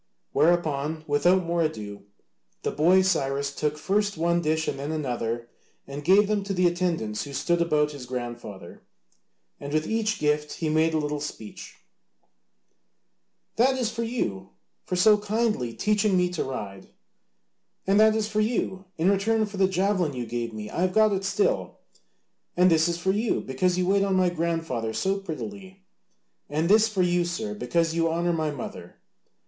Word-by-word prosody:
Whereupon, 155 -2 +1
without 175 +6 +3
more 170 0 0
ado, 105 -11 -4 0.6
the - - -1
boy 180 +5 +4
Cyrus 140 -6 0
took 150 +1 -2
first 205 +4 0
one 170 +1 +1
dish 160 0 0
and - - -2
then 145 +2 -4
another 120 -6 -3 0.4
and 140 +1 -7
gave 195 +5 +5
them 210 -1 0
to 195 -1 -2
the 180 0 +2
attendants 170 -12 0
who 140 - -9
stood 170 +5 0
about 150 -3 +2
his 140 -4 -9
grandfather, 120 -7 -7 0.8
and 140 - -7
with 155 +1 0
each 220 0 0
gift 150 -1 0
he 160 - -2
made 160 +1 +2
a - - +3
little 150 -1 -2
speech: 130 -7 -8 1.8
"That 260 +3 +3
is 240 -3 -1
for 230 0 -4
you, 105 - -3 0.4
for 180 - -2
so 210 +3 +5
kindly 210 - -1
teaching 210 - +1
me 180 0 +1
to 180 - -2
ride;" 100 -7 -7 1.0
"And 195 +2 +3
that 220 0 +5
is 220 -1 0
for 215 0 0
you, 210 -4 -1
in 170 +4 +3
return 215 +3 +1
for 205 -1 -9
the 190 -1 +4
javelin 185 -4 0
you 125 -2 -4
gave 115 0 -3
me, 105 -1 -7
I 170 - -4
have 185 0 +1
got 215 0 +4
it 195 0 -2
still;" 410 - 0 0.8
"And 180 0 +5
this 160 0 +4
is 170 -1 -1
for 190 +2 0
you, 215 +3 0
because 175 +8 0
you 180 - +1
wait 195 +2 +3
on 195 -1 +1
my 185 -1 +3
grandfather 165 -9 -2
so 195 - 0
prettily;" 195 +2 -8 0.7
"And 155 +4 0
this 215 +2 +6
for 200 -4 0
you, 175 0 +2
sir, 175 +5 -3
because 170 -5 0
you 165 0 +1
honour 170 +1 0
my 160 -2 -1
mother." 140 -4 -7
170 Hz, 175 wpm, -26 LUFS, 145-195 Hz, 1.8 s, this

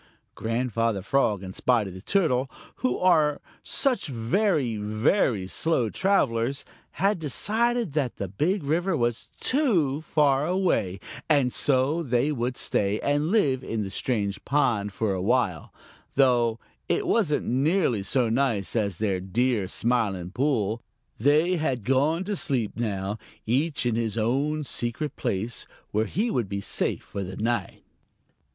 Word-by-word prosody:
Grandfather 115 -3 -1
Frog 105 -5 +1
and 95 0 -7
Spotty 115 -5 +1
the 95 +1 -10
Turtle, 135 - +1 0.3
who 125 -1 0
are 155 -5 +3 0.2
such 270 -3 +1
very, 135 - 0
very 110 - +1
slow 120 - 0
travelers, 135 -9 +1 0.3
had 195 +3 +1
decided 220 - +1
that 140 -5 -1
the 100 - -4
Big 155 - -1
River 165 +4 0
was 120 -2 -1
too 180 - +1
far 145 -2 +2
away, 170 - 0 0.3
and 140 -5 +3
so 140 +4 +2
they 130 0 +1
would 125 -2 -2
stay 100 +1 0
and 145 +2 +1
live 140 - +2
in 110 -3 -2
the 95 - -6
strange 105 -4 -2
pond 115 -8 +1
for 100 0 -1
a 95 - -2
while, 100 -6 0 0.4
though 120 -4 +3 0.3
it - - +1
wasn't 175 -11 +1
nearly 135 - +1
so 120 +5 +1
nice 115 -4 0
as 100 -6 0
their 100 -3 0
dear 105 +2 0
Smiling 100 -6 0
Pool. 115 -3 0 0.4
They 155 +8 +3
bad 135 -8 -1
gone 145 - +2
to 205 +2 -2
sleep 130 - 0
now, 105 -2 -3 0.3
each 140 +5 0
in 120 - +1
his 115 -1 -1
own 140 +7 0
secret 130 +2 -2
place 110 +5 -2 0.2
where 110 +1 +1
he 215 - -1
would 115 -6 -1
be 100 0 -2
safe - - -1
for 100 - -5
the 95 0 -7
night. 115 +2 -2
125 Hz, 145 wpm, -26 LUFS, 110-150 Hz, 0.4 s, are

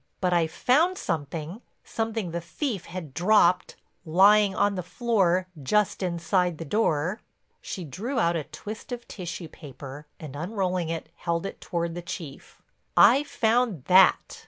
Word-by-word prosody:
"But 180 -1 +1
I 170 -2 +3
found 315 - +2
something, 165 - -4 0.2
something 225 -5 -3
the 170 +1 -3
thief 205 - -4
had 165 -7 -7
dropped, 180 0 +3 0.3
lying 195 +4 +5
on 205 0 +2
the 185 - -3
floor 185 -2 +1 0.2
just 210 +11 +1
inside 180 -1 0
the 165 - -6
door." 175 +1 0 0.4
She 185 - -6
drew 215 - -4
out 170 -5 +2
a 155 -3 -2
twist 215 - -9
of 240 -1 -6
tissue 175 -2 -6
paper, 145 0 -10
and 145 -3 -8
unrolling 180 0 -2
it 165 -1 -4
held 170 +1 -2
it - - -7
toward 170 -1 -2
the 175 - -5
Chief; 160 -4 -9 0.3
"I 275 - +7
found 230 - +1
that." 190 +1 +4
180 Hz, 150 wpm, -26 LUFS, 165-210 Hz, 0.4 s, I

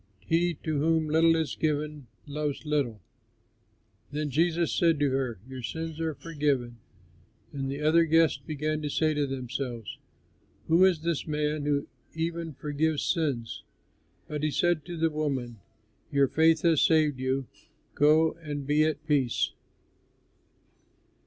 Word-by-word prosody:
He 170 +1 +1
to 155 -3 -1
whom 160 +1 +2
little 165 +2 +4
is 160 -5 -1
forgiven, 150 -3 -2 0.2
loves 150 +1 -3
little." 140 -8 -1 1.1
Then 150 0 -2
Jesus 165 +3 +1
said 165 -3 +3
to 145 -2 +2
her, 130 -4 -1
"Your 130 -1 -7
sins 160 +5 -5
are 160 -2 -2
forgiven." 140 -7 -1 0.8
And 135 -1 -3
the 140 +2 -4
other 165 +2 +5
guests 165 -3 +3
began 155 +2 -3
to 150 - -3
say 155 +2 +1
to 145 -1 0
themselves, 125 -3 -5 0.7
"Who 170 +4 +6
is 180 -5 +2
this 165 -2 -2
man 150 -1 -1
who 145 -1 0 0.3
even 165 -1 -3
forgives 150 +2 -1
sins?" 140 - -1 0.7
But 150 -1 -4
he 155 - +1
said 170 0 +1
to 175 -1 -6
the 165 0 +1
woman, 135 -7 -3 0.5
"Your 140 -1 +4
faith 160 +3 +3
has 165 -4 +4
saved 155 -4 +3
you; 130 +1 -1 0.5
go 155 +2 +4
and 145 -3 -5
be 150 +2 +3
at 155 -1 -1
peace." 140 -6 +1
150 Hz, 140 wpm, -28 LUFS, 140-160 Hz, 1.1 s, Who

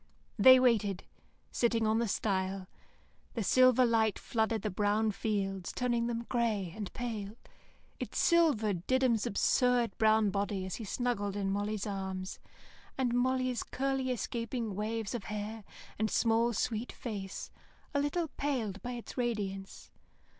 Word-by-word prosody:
They 260 +4 +9
waited, 215 -7 +2 0.5
sitting 230 -2 +1
on 220 +1 +2
the 235 - +1
stile. 190 -2 -1 0.7
The 225 - -1
silver 255 +4 +5
light 225 -3 +2
flooded 220 -2 -1
the 210 - -1
brown 210 +3 +1
fields, 195 -3 -2
turning 240 -2 0
them 235 0 -3
grey 215 -8 0
and 210 -3 -5
pale. 220 -3 -4 0.6
It - - -5
silvered 225 - +2
Diddums' 255 -4 +2
absurd 245 +3 +2
brown 220 -1 +4
body 200 -1 -1
as 190 - -4
he 225 - -6
snuggled 205 -3 -1
in 195 -1 -1
Molly's 205 +1 -2
arms, 190 -2 -4 0.6
and 250 -3 +1
Molly's 255 0 +1
curly, 270 0 -1
escaping 230 -1 -3
waves 215 +2 -3
of 235 -5 -4
hair 210 +1 -5 0.4
and 220 0 +1
small 230 +2 +2
sweet 230 +1 -2
face, 200 -5 -6 0.4
a 285 - +2
little 305 +4 0
paled 235 -11 -2
by 245 0 -4
its 240 +1 -7
radiance. 200 -5 -3
220 Hz, 140 wpm, -32 LUFS, 200-245 Hz, 0.7 s, They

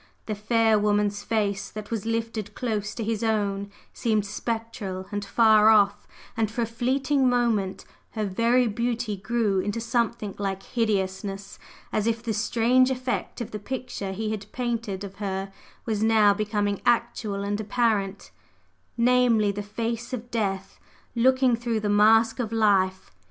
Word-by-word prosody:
The 215 - -2
fair 220 +1 +2
woman's 205 0 +1
face 205 -3 -1
that 215 0 -8
was 225 -1 -3
lifted 225 -2 -2
so 205 - -23
close 215 -4 -2
to 230 - -3
his 220 0 -2
own 200 -2 0 0.2
seemed 215 -3 0
spectral 210 -3 -4
and 205 -1 -3
far 215 +1 +5
off; 205 -2 +4 0.3
and 220 -2 0
for 235 +2 -2
a - - +1
fleeting 260 +4 +1
moment 230 -6 0 0.3
her 215 -2 -1
very 230 +6 +2
beauty 235 0 -1
grew 215 -1 0
into 205 +4 -2
something 230 -3 -1
like 195 -1 -3
hideousness, 195 -3 -2 0.3
as 215 +1 +1
if 230 0 -1
the 230 -2 -1
strange 240 +4 +3
effect 255 -2 -3
of 230 - -5
the 210 - -5
picture 245 -4 -5
he 215 +3 -3
had 210 -1 -6
painted 230 -5 -3
of 195 -1 -9
her 195 -1 -4 0.3
was 215 -2 -1
now 220 -2 +5
becoming 205 -1 -1
actual 230 -4 0
and 205 +1 -2
apparent 205 -3 -1 0.7
namely, 235 -3 +3
the 205 +1 -4
face 230 +4 -4
of 240 0 -5
death 195 -4 -2 0.3
looking 255 +1 +3
through 235 -1 -2
the 210 -1 -2
mask 225 +3 +4
of 230 -3 -2
life. 195 -4 +2
220 Hz, 155 wpm, -25 LUFS, 205-235 Hz, 0.7 s, far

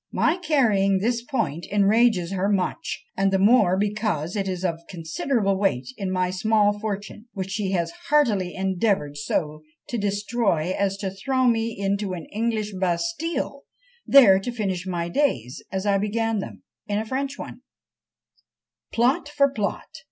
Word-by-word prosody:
My 325 - +2
carrying 225 - +2
this 230 +4 0
point 175 - -2
enrages 205 -2 +3
her 195 +1 0
much_, 195 -3 -1 0.2
and 195 0 +2
the 195 - +3
more 200 -2 +4
because 205 -5 -1
it 195 -2 -1
is 185 0 -3
of 165 -2 -1
considerable 195 - -1
weight 165 -11 0
in 195 -5 -3
my 185 -1 0
small 205 +1 +2
fortune, 210 +1 -5
which 190 -1 -4
she 195 -1 -1
has 170 -2 0 0.2
heartily 215 -12 +2
endeavoured 190 -5 0
so 150 +1 -2 0.3
to 240 - -2
destroy 200 -4 0
as 195 -1 0
to 195 -1 -3
throw 260 +7 0
me 230 -1 +1
into 200 0 -1
an 170 -3 -6
English 215 -1 -1
Bastile, 280 - -2 0.5
there 225 -9 +8
to 220 +5 -4
finish 190 -6 -3
my 170 -2 -2
days, 170 - -1
as 190 +1 -3
I 200 -1 +3
began 225 +1 0
them, 100 - -7 0.2
in 205 -1 -1
a 220 - -1
French 270 +4 -3
one." - - -8 1.3
Plot 270 +7 +1
for 280 -2 +2
plot! 210 -6 -2
200 Hz, 155 wpm, -24 LUFS, 185-230 Hz, 1.3 s, there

